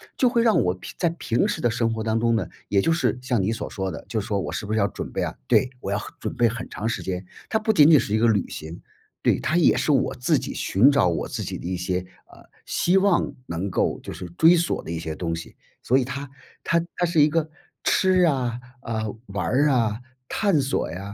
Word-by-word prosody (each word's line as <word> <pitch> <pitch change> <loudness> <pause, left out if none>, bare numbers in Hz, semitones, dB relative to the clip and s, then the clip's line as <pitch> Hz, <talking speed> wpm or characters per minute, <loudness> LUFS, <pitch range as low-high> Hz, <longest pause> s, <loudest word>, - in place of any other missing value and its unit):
就 255 - +3
会 235 -2 +2
让 225 -2 +4
我 90 - +1
平 95 - -10
在 170 - +2
平 145 -8 0
时 - - -1
的 120 - +2
生 115 0 0
活 110 - -3
当 110 0 0
中 115 -1 +2
呢， - - -2 0.2
也 100 - +3
就 165 +11 +2
是 125 -7 0
像 125 -4 0
你 100 - 0
所 115 - -4
说 95 -1 -3
的， - - -8
就 110 - -2
是 100 - -8
说 100 -3 0
我 - - -3
是 - - -4
不 105 - -5
是 110 - +1
要 100 - +3
准 100 - -6
备 - - -2
啊， - - -3
对， 130 - +3
我 100 - -4
要 100 - 0 0.2
准 - - -3
备 120 - +3
很 115 +1 -5
长 110 - -4
时 115 - -2
间， 95 0 -4 0.2
它 220 - +1
不 220 0 +1
仅 150 -2 +7
仅 150 - +8
是 105 - -1
一 - - +3
个 115 +2 +3
旅 105 -4 +2
行 80 +2 -8 0.4
对， - - +3
它 165 - +1
也 175 - +5
是 - - +1
我 135 -2 +1
自 125 - +1
己 - - -5
寻 110 +9 +4
找 140 -11 +3
我 85 - -2
自 - - -4
己 - - -4
的 - - -10
一 95 - -2
些， 90 0 -1 0.3
呃， - - -16 0.2
希 180 - +1
望 195 -1 +3
能 85 +4 -3
够 - - 0
就 - - -8
是 - - -7
追 165 +2 +7
索 170 0 0
的 - - -10
一 85 - -3
些 80 -1 -4
东 85 +1 -3
西。 80 0 -9 0.3
所 130 - +3
以 130 - +1
它 140 +2 -6 0.3
它 170 +1 +2
它 175 - +1
是 165 -2 +3
一 145 - +6
个 160 0 0 0.3
吃 185 -1 +3
啊， 130 -8 +1 0.2
呃， 110 -4 -3
玩 100 -3 -3 0.2
啊， 115 -6 +1 0.3
探 200 -6 +2
索 135 - -1
呀、 95 +5 -7
115 Hz, 275 characters per minute, -24 LUFS, 100-155 Hz, 0.4 s, 仅